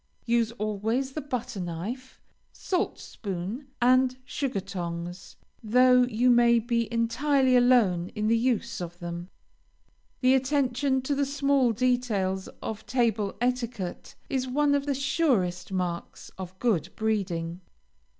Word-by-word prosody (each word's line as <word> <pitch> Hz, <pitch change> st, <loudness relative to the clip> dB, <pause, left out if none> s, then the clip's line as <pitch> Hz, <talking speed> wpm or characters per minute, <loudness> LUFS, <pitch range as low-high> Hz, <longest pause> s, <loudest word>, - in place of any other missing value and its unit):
Use, 235 Hz, -1 st, +2 dB
always, 220 Hz, +4 st, -1 dB
the 305 Hz, -, -4 dB
butter 250 Hz, -5 st, -4 dB
knife, 190 Hz, +10 st, -5 dB, 0.3 s
salt 370 Hz, +1 st, -2 dB
spoon, 200 Hz, +7 st, -6 dB
and 255 Hz, +1 st, +4 dB
sugar 265 Hz, -7 st, -2 dB
tongs, 175 Hz, -1 st, -6 dB, 0.3 s
though 250 Hz, +2 st, +5 dB
you 245 Hz, +1 st, +2 dB
may 235 Hz, 0 st, +5 dB
be 235 Hz, 0 st, 0 dB
entirely 255 Hz, +3 st, +2 dB
alone 230 Hz, -8 st, +4 dB
in 215 Hz, -1 st, -1 dB
the 225 Hz, +2 st, +3 dB
use 230 Hz, -2 st, 0 dB
of 175 Hz, 0 st, -6 dB
them. 175 Hz, 0 st, -6 dB, 0.9 s
The 255 Hz, 0 st, +5 dB
attention 265 Hz, -1 st, +1 dB
to 285 Hz, -, 0 dB
the 280 Hz, 0 st, +1 dB
small 275 Hz, -3 st, +2 dB
details 225 Hz, -6 st, 0 dB, 0.2 s
of 220 Hz, -1 st, -5 dB
table 225 Hz, -5 st, 0 dB
etiquette 235 Hz, -6 st, -3 dB
is 260 Hz, -1 st, -1 dB
one 285 Hz, +3 st, +2 dB
of 285 Hz, 0 st, 0 dB
the 280 Hz, -, +1 dB
surest 260 Hz, -, 0 dB
marks 180 Hz, -2 st, -4 dB
of 185 Hz, 0 st, -8 dB
good 190 Hz, -8 st, +1 dB
breeding. 180 Hz, -6 st, -2 dB
235 Hz, 130 wpm, -27 LUFS, 190-255 Hz, 0.9 s, though